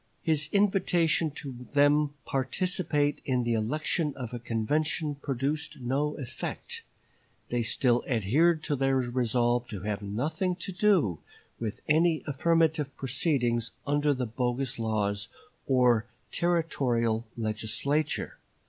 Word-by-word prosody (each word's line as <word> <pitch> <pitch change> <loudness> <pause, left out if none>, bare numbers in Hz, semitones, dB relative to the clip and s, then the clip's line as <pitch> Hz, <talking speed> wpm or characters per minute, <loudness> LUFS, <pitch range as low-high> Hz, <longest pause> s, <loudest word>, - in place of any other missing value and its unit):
His 155 -2 +1
invitation 180 -5 +2
to 135 -4 -8
them 145 +1 +5
to 145 - -18
participate 145 +2 0
in 125 -2 0
the 120 0 +1
election 150 - 0
of 125 -3 -6
a 120 - -4
convention 145 +7 -1
produced 140 +1 -3
no 140 +4 -1
effect; 130 -3 -5 0.7
they 120 0 0
still 120 +2 +2
adhered 145 - +2
to 145 - 0
their 135 0 +2
resolve 120 -1 +1
to 100 -4 -6
have 105 0 -3
nothing 155 - -1
to 180 +2 -6
do 180 - +2 0.4
with 110 -3 -4
any 160 +1 +3
affirmative 155 0 +1
proceedings 125 -4 0
under 145 +1 +2
the 130 -2 -1
bogus 120 +2 -1
laws 105 -3 0 0.4
or 125 -3 +3 0.2
Territorial 125 -10 +1
Legislature. 115 +7 -1
135 Hz, 120 wpm, -29 LUFS, 120-155 Hz, 0.7 s, them